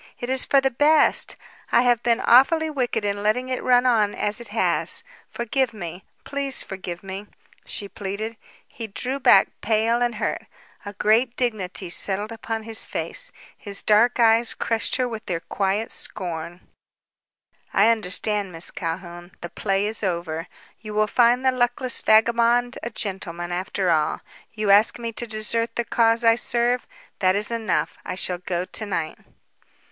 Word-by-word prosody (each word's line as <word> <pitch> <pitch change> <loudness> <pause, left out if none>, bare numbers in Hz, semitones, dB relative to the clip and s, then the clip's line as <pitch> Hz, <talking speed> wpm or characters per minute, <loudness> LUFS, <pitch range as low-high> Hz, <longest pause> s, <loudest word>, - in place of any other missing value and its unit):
It 245 +1 -4
is 260 -1 +6
for 275 - +4
the 270 0 0
best. 300 +5 +3 0.4
I 240 - +4
have 240 -2 +2
been 235 0 +1
awfully 315 +6 +4
wicked 250 -6 -2
in 205 0 -2
letting 245 +5 0
it 255 - -2
run 250 0 +3
on 220 -5 +2
as 210 +3 -2
it 235 - -10
has. 220 - 0 0.3
Forgive 235 +1 -1
me, 175 -1 -7 0.2
please 280 -1 -1
forgive 185 -2 -7
me," 195 +2 -7 0.4
she 200 - -3
pleaded. 205 +3 -5 0.3
He 230 - -8
drew 255 +6 -4
back, 195 -7 +5
pale 225 +2 +1
and 240 -1 0
hurt. 210 - -3 0.4
A 205 - -6
great 230 +4 +1
dignity 205 -6 -2
settled 200 +4 +2
upon 225 -1 -5
his 225 0 -2
face. - - -1 0.2
His 200 -2 -1
dark 230 +4 +3
eyes 230 0 +4
crushed 225 -1 -1
her 255 -1 0
with 225 -2 -6
their 175 -3 -2
quiet 200 +5 -2
scorn. 175 0 -5 1.1
"I 210 +3 +4
understand, 205 -1 -1
Miss 165 0 0
Calhoun. 175 +1 -6
The 175 - -6
play 195 +1 -1
is 215 +1 -1
over. 170 -4 -3 0.3
You 215 -1 -8
will 215 0 +3
find 245 +3 +3
the 260 - +5
luckless 250 0 0
vagabond 235 +2 +3
a 235 - -4
gentleman, 185 -5 -5
after 185 0 -1
all. 155 -2 0 0.3
You 215 -2 0
ask 205 +4 +5
me 230 -1 -5
to 235 +1 -5
desert 220 +1 -1
the 235 - -1
cause 230 +1 +2
I 230 0 +6
serve. 240 +1 0 0.3
That 185 -1 +3
is 210 +2 +2
enough. 225 -4 -2
I - - -5
shall 180 -1 -2
go 180 0 -3
to 215 - -3
night." 165 -5 -3
220 Hz, 165 wpm, -23 LUFS, 195-240 Hz, 1.1 s, is